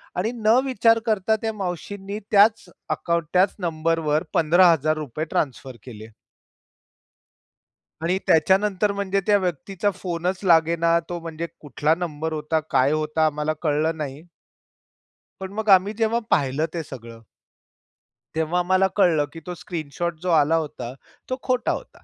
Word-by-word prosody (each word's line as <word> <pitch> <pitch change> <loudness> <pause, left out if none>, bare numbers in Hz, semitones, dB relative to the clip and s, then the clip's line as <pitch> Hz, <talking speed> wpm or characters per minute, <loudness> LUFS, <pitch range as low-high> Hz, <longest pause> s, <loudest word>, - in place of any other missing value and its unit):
आणि 210 +6 -1
न 220 +1 +3
विचार 230 -2 +3
करता 215 0 +2
त्या 220 -1 -2
मावशीनी 200 +2 -5
त्याच 210 +1 +5 0.2
अकाउंट, 170 -1 -1
त्याच 185 +2 +3
नंबरवर 160 -2 0
₹15,000 155 -3 +3
ट्रान्सफर 130 -2 -2
केले. 110 -3 -10 1.9
आणि 180 +3 +1
त्याच्यानंतर 195 +5 +3
म्हणजे 200 0 -1
त्या 205 -1 +5
व्यक्तीचा 190 +2 -2
फोनच 180 0 -3
लागेना. 170 -1 +3
तो 175 -1 -4
म्हणजे 165 0 -5
कुठला 150 +2 0
नंबर 160 -2 -4
होता? 155 +1 -1
काय 135 +1 +3
होता? 155 +1 0
आम्हाला 150 +1 0
कळलं 160 +1 0
नाही. 150 +3 -6 1.1
पण 190 0 -6
मग 220 0 -3
आम्ही 195 +2 +5
जेव्हा 230 +1 +1
पाहिलं 145 +1 +1
ते 165 -2 -3
सगळं. 115 -4 -10 1.2
तेव्हा 160 +3 0
मला 185 +1 +3
कळलं, 165 -7 +3
की 165 - -8
तो 180 - -4
स्क्रीनशॉट 170 0 -4
जो 180 - -3
आला 155 0 +4
होता, 130 -6 -4 0.4
तो 255 - -2
खोटा 255 -1 0
होता. - - -7
170 Hz, 135 wpm, -23 LUFS, 155-195 Hz, 1.9 s, त्याच